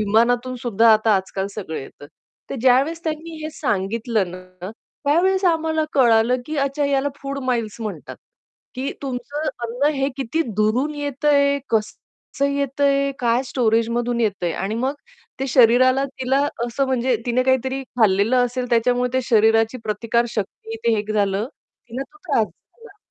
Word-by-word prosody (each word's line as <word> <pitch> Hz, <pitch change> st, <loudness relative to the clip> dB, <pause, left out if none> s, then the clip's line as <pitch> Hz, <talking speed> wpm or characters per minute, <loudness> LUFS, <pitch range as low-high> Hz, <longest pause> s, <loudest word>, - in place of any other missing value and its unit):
विमानातून 240 Hz, +4 st, +2 dB
सुद्धा 230 Hz, -1 st, +4 dB
आता 215 Hz, 0 st, +3 dB
आजकाल 190 Hz, 0 st, -3 dB
सगळं 180 Hz, -7 st, -5 dB
येतं. 140 Hz, +1 st, -11 dB, 0.4 s
तर -, -, -3 dB
ज्यावेळेस 270 Hz, +7 st, +3 dB
त्यांनी 320 Hz, +1 st, -4 dB
हे 310 Hz, -, -4 dB
सांगितलं 215 Hz, -, -1 dB
ना, 185 Hz, +1 st, -9 dB, 0.3 s
त्यावेळेस 375 Hz, +6 st, +2 dB
आम्हाला 320 Hz, -2 st, +1 dB
कळालं, 235 Hz, -2 st, +4 dB
की 310 Hz, -, -4 dB
अच्छा 275 Hz, +1 st, 0 dB
याला 280 Hz, 0 st, +1 dB
फूड 275 Hz, 0 st, -4 dB
माईल्स 230 Hz, -3 st, -2 dB
म्हणतात. 215 Hz, -3 st, -6 dB, 0.6 s
की 265 Hz, +2 st, -3 dB
तुमचं 275 Hz, +3 st, -4 dB, 0.2 s
अन्न 250 Hz, +6 st, +1 dB
हे 270 Hz, 0 st, 0 dB
किती 275 Hz, +4 st, -1 dB
दुरून 235 Hz, +8 st, +1 dB
येतंय, 285 Hz, 0 st, +1 dB
कसं 225 Hz, +5 st, -3 dB
येतंय, 280 Hz, 0 st, +1 dB
काय 240 Hz, +1 st, +2 dB
स्टोरेजमधून 235 Hz, 0 st, 0 dB
येतंय 200 Hz, -6 st, 0 dB
आणि 195 Hz, +6 st, -3 dB
मग 260 Hz, +5 st, -1 dB, 0.5 s
ते 270 Hz, -, 0 dB
शरीराला 255 Hz, +2 st, +5 dB
तिला 265 Hz, 0 st, -1 dB, 0.3 s
असं 255 Hz, +3 st, -1 dB
म्हणजे 255 Hz, -1 st, +1 dB
तिने 245 Hz, +1 st, +2 dB
काहीतरी 260 Hz, +1 st, 0 dB
खाल्लेलं 220 Hz, -2 st, +2 dB
असेल, 250 Hz, +1 st, -4 dB
त्याच्यामुळे 245 Hz, +1 st, +2 dB
ते 260 Hz, 0 st, +1 dB
शरीराची 225 Hz, +1 st, +3 dB
प्रतिकार 230 Hz, +3 st, 0 dB
शक्ती 220 Hz, +2 st, -5 dB
ते 230 Hz, -1 st, +3 dB
हे 205 Hz, -, 0 dB
झालं, 200 Hz, 0 st, 0 dB, 0.4 s
तिला 250 Hz, +3 st, -3 dB
तो 405 Hz, -, -20 dB
त्रास 275 Hz, -9 st, +2 dB
झाला. 460 Hz, -, -20 dB
245 Hz, 145 wpm, -21 LUFS, 225-275 Hz, 0.6 s, शरीराला